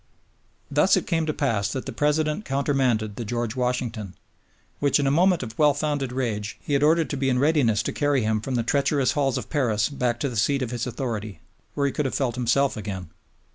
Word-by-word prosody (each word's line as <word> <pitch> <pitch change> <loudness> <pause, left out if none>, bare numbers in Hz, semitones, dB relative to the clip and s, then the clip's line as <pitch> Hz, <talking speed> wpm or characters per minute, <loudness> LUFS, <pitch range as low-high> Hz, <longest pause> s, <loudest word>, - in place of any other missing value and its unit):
Thus - - +4
it - - -1
came 165 -2 0
to - - +2
pass 110 -10 0
that 130 - -4
the - - -4
President 150 +5 0
countermanded 130 - 0
the 120 - -3
George 120 +1 -3
Washington, 120 -6 -2 0.6
which, 145 0 +2
in 140 - +1
a 135 - +2
moment 175 +1 +3
of 110 -1 -7
well 150 -2 +5
founded 145 -3 -1
rage, 110 -5 -3
he 145 - -4
had 140 - +3
ordered 160 +2 +3
to 145 - -2
be 135 0 0
in 125 - +2
readiness 130 -6 +2
to - - -3
carry 145 -4 +1
him 110 0 0
from 130 +3 -3
the 120 - +1
treacherous 140 +1 +1
halls 135 -4 0
of - - -6
Paris 115 -8 +1
back 125 -4 -1
to 140 - +1
the 120 - -7
seat 135 +5 +2
of 120 - -4
his 120 0 -3
authority, 115 -5 -4 0.3
where 140 - +1
he 140 - +1
could 150 - -2
have 130 - -2
felt 130 -4 0
himself 125 +3 +1
again. 95 -6 -6
130 Hz, 220 wpm, -24 LUFS, 115-145 Hz, 0.6 s, well